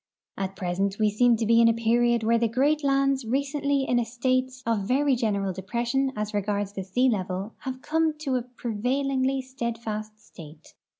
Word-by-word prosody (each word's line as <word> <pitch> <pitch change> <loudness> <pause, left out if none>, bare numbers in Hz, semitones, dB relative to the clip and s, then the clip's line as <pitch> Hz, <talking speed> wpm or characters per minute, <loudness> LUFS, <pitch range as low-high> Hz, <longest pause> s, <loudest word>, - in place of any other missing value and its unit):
At 195 0 -4
present 195 +1 -1
we 215 -1 +2
seem 240 +3 +4
to 225 0 -1
be 230 +1 +5
in 230 - +6
a 230 - +5
period 235 0 +2
where 230 +1 +3
the 230 - +2
great 285 +6 +1
lands 275 -1 +2
recently 280 +3 0
in 245 -2 +1
a - - +1
state 255 +2 0
of 230 -2 +1
ver^'' 275 +2 +2
general 200 -5 -1
depression 240 +8 -1
as 210 0 -3
regards 205 0 -1
the 195 - -4
sea 245 +8 +1
level 195 -2 -2
have 260 -2 -6
come 320 0 +1
to 270 -4 -1
a 250 - +1
pre 245 -1 -6
vailingly 265 +3 0
steadfast 225 -4 -5
state. 155 -6 -14
235 Hz, 185 wpm, -26 LUFS, 210-265 Hz, -, in